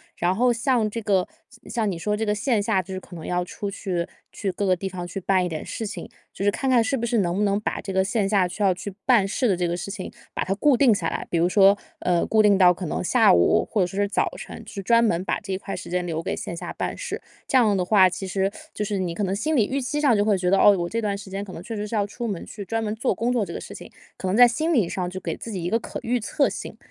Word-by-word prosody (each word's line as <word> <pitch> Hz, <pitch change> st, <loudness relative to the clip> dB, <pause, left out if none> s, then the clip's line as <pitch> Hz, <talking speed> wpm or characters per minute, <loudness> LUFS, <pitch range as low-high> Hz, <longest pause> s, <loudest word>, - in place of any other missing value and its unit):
然 175 Hz, +1 st, +1 dB
后 245 Hz, +4 st, +3 dB
像 235 Hz, -2 st, +1 dB
这 230 Hz, -, -4 dB
个 195 Hz, -4 st, +1 dB, 0.2 s
像 245 Hz, -3 st, -17 dB
像 220 Hz, -4 st, 0 dB
你 170 Hz, -, -4 dB
说 210 Hz, +5 st, -1 dB
这 220 Hz, +1 st, -2 dB
个 210 Hz, -, +1 dB
线 225 Hz, -1 st, +1 dB
下， 200 Hz, -3 st, +2 dB
就 190 Hz, +2 st, -8 dB
是 185 Hz, -, -3 dB
可 180 Hz, -, -13 dB
能 160 Hz, -, -8 dB
要 180 Hz, 0 st, 0 dB
出 200 Hz, +3 st, -5 dB
去， 180 Hz, -3 st, -3 dB, 0.2 s
去 200 Hz, -3 st, -3 dB
各 205 Hz, -, -4 dB
个 185 Hz, -2 st, +3 dB
地 190 Hz, +2 st, -4 dB
方 180 Hz, -2 st, -5 dB
去 195 Hz, -, -5 dB
办 185 Hz, 0 st, +2 dB
一 180 Hz, -, -1 dB
点 155 Hz, -1 st, -5 dB
事 220 Hz, -, -4 dB
情， -, -, -7 dB, 0.2 s
就 195 Hz, -, -4 dB
是 205 Hz, -, +4 dB
看 265 Hz, +5 st, -2 dB
看 245 Hz, -3 st, +5 dB
是 250 Hz, +5 st, 0 dB
不 235 Hz, -, -4 dB
是 235 Hz, 0 st, +1 dB
能 175 Hz, -3 st, +1 dB
不 210 Hz, -, +1 dB
能 200 Hz, 0 st, +2 dB
把 215 Hz, -, -3 dB
这 195 Hz, -, -5 dB
个 190 Hz, 0 st, +2 dB
线 200 Hz, -1 st, 0 dB
下 195 Hz, -4 st, +3 dB
需 205 Hz, -, -8 dB
要 195 Hz, -, +4 dB
去 195 Hz, +2 st, -7 dB
办 235 Hz, -7 st, +5 dB
事 240 Hz, +5 st, 0 dB
的 190 Hz, -, +2 dB
这 175 Hz, -1 st, 0 dB
个 170 Hz, -, -1 dB
事 175 Hz, +2 st, -5 dB
情， 195 Hz, -2 st, -5 dB, 0.3 s
把 -, -, 0 dB
它 190 Hz, -, 0 dB
固 270 Hz, +5 st, +3 dB
定 250 Hz, -5 st, +5 dB
下 175 Hz, -5 st, -1 dB
来， -, -, -4 dB
比 170 Hz, -, +1 dB
如 175 Hz, +2 st, +3 dB
说， 195 Hz, 0 st, +6 dB, 0.2 s
呃， 175 Hz, -1 st, +1 dB
固 215 Hz, -1 st, +4 dB
定 205 Hz, -1 st, +5 dB
到 180 Hz, -1 st, +7 dB
可 180 Hz, 0 st, -4 dB
能 155 Hz, -, -2 dB
下 230 Hz, +5 st, +5 dB
午， 85 Hz, -1 st, +3 dB
或 210 Hz, -, +1 dB
者 180 Hz, -, +2 dB
说 195 Hz, +3 st, -5 dB
是 205 Hz, -, +2 dB
早 200 Hz, -, 0 dB
晨， -, -, -9 dB
就 195 Hz, -, -7 dB
专 230 Hz, +3 st, +4 dB
门 185 Hz, -4 st, +1 dB
把 -, -, -1 dB
这 200 Hz, -2 st, -8 dB
一 190 Hz, -, 0 dB
块 195 Hz, +1 st, -6 dB
时 175 Hz, -, -8 dB
间 180 Hz, 0 st, -1 dB
留 165 Hz, -1 st, -2 dB
给 -, -, -3 dB
线 170 Hz, -, -5 dB
下 -, -, -6 dB
办 -, -, -3 dB
事。 -, -, -5 dB, 0.3 s
这 265 Hz, -, +3 dB
样 220 Hz, -5 st, +4 dB
的 185 Hz, -, +1 dB
话， 190 Hz, 0 st, +5 dB
其 185 Hz, +2 st, -4 dB
实 195 Hz, +1 st, 0 dB, 0.2 s
就 210 Hz, -, -3 dB
是 200 Hz, -1 st, -2 dB
你 175 Hz, -2 st, -2 dB
可 205 Hz, -, -2 dB
能 190 Hz, +1 st, 0 dB
心 305 Hz, +9 st, 0 dB
里 225 Hz, -, +4 dB
预 270 Hz, +5 st, -2 dB
期 295 Hz, +4 st, -2 dB
上 280 Hz, -6 st, +4 dB
就 205 Hz, -, +3 dB
会 205 Hz, -2 st, +2 dB
觉 180 Hz, -1 st, 0 dB
得 195 Hz, -, +4 dB
哦， 205 Hz, -1 st, +6 dB
我 175 Hz, -1 st, -1 dB
这 230 Hz, +5 st, -2 dB
段 205 Hz, -2 st, -1 dB
时 195 Hz, -1 st, -11 dB
间 200 Hz, +1 st, -3 dB
可 195 Hz, -, -9 dB
能 165 Hz, -, -7 dB
确 225 Hz, -, -6 dB
实 210 Hz, 0 st, -3 dB
是 225 Hz, -, -4 dB
要 205 Hz, -2 st, +2 dB
出 235 Hz, +4 st, -5 dB
门 195 Hz, -6 st, -4 dB
去 205 Hz, -, -8 dB
专 225 Hz, +3 st, -2 dB
门 210 Hz, 0 st, -2 dB
做 225 Hz, -2 st, 0 dB
工 235 Hz, +4 st, 0 dB
作 235 Hz, -4 st, +1 dB
这 -, -, -6 dB
个 -, -, -5 dB
事 -, -, -9 dB
情， -, -, -11 dB, 0.2 s
可 190 Hz, -, -5 dB
能 190 Hz, +4 st, +1 dB
在 245 Hz, 0 st, +9 dB
心 310 Hz, +8 st, -1 dB
理 225 Hz, -, +3 dB
上 180 Hz, -1 st, -3 dB
就 185 Hz, -, -6 dB
给 165 Hz, -3 st, -4 dB
自 230 Hz, -, -8 dB
己 185 Hz, -5 st, -4 dB
一 175 Hz, -, -1 dB
个 230 Hz, -, +2 dB
可 -, -, -7 dB
预 245 Hz, +2 st, 0 dB
测 275 Hz, +6 st, +1 dB
性， -, -, -6 dB
200 Hz, 345 characters per minute, -24 LUFS, 185-225 Hz, 0.3 s, 在